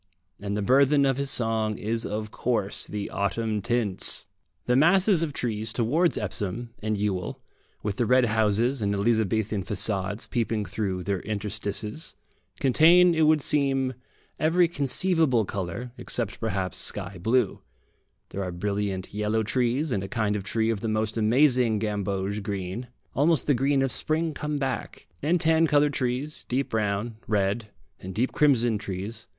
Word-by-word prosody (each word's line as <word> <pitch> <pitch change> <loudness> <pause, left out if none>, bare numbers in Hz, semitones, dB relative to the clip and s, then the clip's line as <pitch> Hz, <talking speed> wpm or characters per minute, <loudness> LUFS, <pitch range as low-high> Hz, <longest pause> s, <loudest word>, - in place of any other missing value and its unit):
And 100 0 -3
the 105 - -1
burthen 140 +4 +4
of 135 -1 +1
his 140 0 -2
song 110 -3 0
is 115 +2 -2
of 105 +1 -4
course 115 -5 -1
the 105 -1 -5
autumn 105 +1 -1
tints. 115 -3 +1 0.4
The 125 - +2
masses 180 +5 +4
of 165 -3 -1
trees 110 -5 -3
towards 145 +10 +1
Epsom 110 +4 -4
and 110 0 -1
Ewell, 100 -3 -2 0.4
with 100 -1 -2
the 120 - +1
red 125 +1 +5
houses 110 +3 +1
and 100 0 0
Elizabethan 110 -1 +1
façades 100 +2 -1
peeping 115 -3 -1
through 95 -1 -3
their 100 -1 -1
interstices, 105 - -4 0.4
contain, 170 +6 +6
it 160 -1 +3
would 155 -1 +4
seem, 135 -3 +1 0.5
every 170 +3 +4
conceivable 150 - +1
colour, 100 +6 -5
except 115 -5 -3
perhaps 95 -5 -2
sky 100 -2 -4
blue; 120 +6 +1 0.7
there 100 - -5
are 90 - -4
brilliant 100 +1 -3
yellow 105 +2 0
trees, 125 +6 0
and 100 - 0
a - - -4
kind 110 -2 -1
of 105 - -2
tree 110 +3 0
of 110 - -2
the 115 - -3
most 110 0 -1
amazing 120 0 +3
gamboge 100 -1 -2
green, 100 +4 -4 0.3
almost 150 0 +2
the 145 - +3
green 135 +2 +2
of 135 - 0
spring 160 +1 0
come 150 +1 -3
back, 135 -3 -4 0.2
and 170 +3 +2
tan 160 0 +3
coloured 145 -1 +3
trees, 130 +3 -2
deep 135 +2 0
brown, 110 +1 -1
red, 105 +1 0 0.3
and 95 0 -8
deep 125 +4 0
crimson 120 -7 +3
trees. 105 +3 -6
115 Hz, 155 wpm, -26 LUFS, 100-135 Hz, 0.7 s, contain